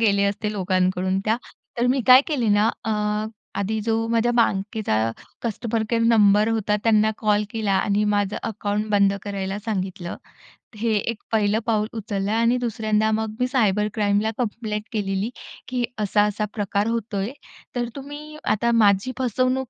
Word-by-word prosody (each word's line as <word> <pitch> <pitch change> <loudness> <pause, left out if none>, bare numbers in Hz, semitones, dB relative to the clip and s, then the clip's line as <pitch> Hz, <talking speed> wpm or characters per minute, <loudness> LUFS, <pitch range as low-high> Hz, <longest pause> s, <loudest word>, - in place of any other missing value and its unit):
गेले 200 -3 +3
असते 210 +1 -1
लोकांकडून 185 -1 0
त्या, 220 +1 +2 0.4
तर 240 - +2
मी 260 +2 +2
काय 255 +1 +9
केले 270 -8 0
ना 215 +2 +4 0.2
अ, 225 - -1 0.7
आधी 215 +2 -1
जो 225 0 0
माझ्या 230 +1 +2
बँकेचा 215 - +1 0.5
कस्टमर 230 0 -2
केअर 230 0 +1
नंबर 210 -2 +5
होता 215 -2 +1
त्यांना 215 -1 +4
कॉल 210 -1 +2
केला 215 -3 -1
आणि 200 +2 +2
माझं 205 0 0
अकाउंट 210 -1 -2
बंद 200 -1 +4
करायला 195 -1 -3
सांगितलं. 190 -4 -3 0.6
हे 225 +2 0
एक 230 +2 -2
पहिलं 215 -1 +2
पाऊल 215 -2 +1
उचललं 205 -2 -3
आणि 230 +2 +3
दुसऱ्यांदा 220 -2 0
मग 220 0 -1
मी 250 - +2
सायबर 210 -5 +2
क्राईमला 205 0 +1
कंप्लेंट 215 -3 -3
केलेली 200 -1 -1 0.4
की 250 -1 -1 0.2
असा-असा 210 +1 +1
प्रकार 205 0 -1
होतोय, 225 -2 -2 0.4
तर 240 -1 -1
तुम्ही 290 +2 -8 0.2
आता 235 +3 +1
माझी 205 +1 +3
फसवणूक 255 +1 0
215 Hz, 150 wpm, -23 LUFS, 205-230 Hz, 0.7 s, काय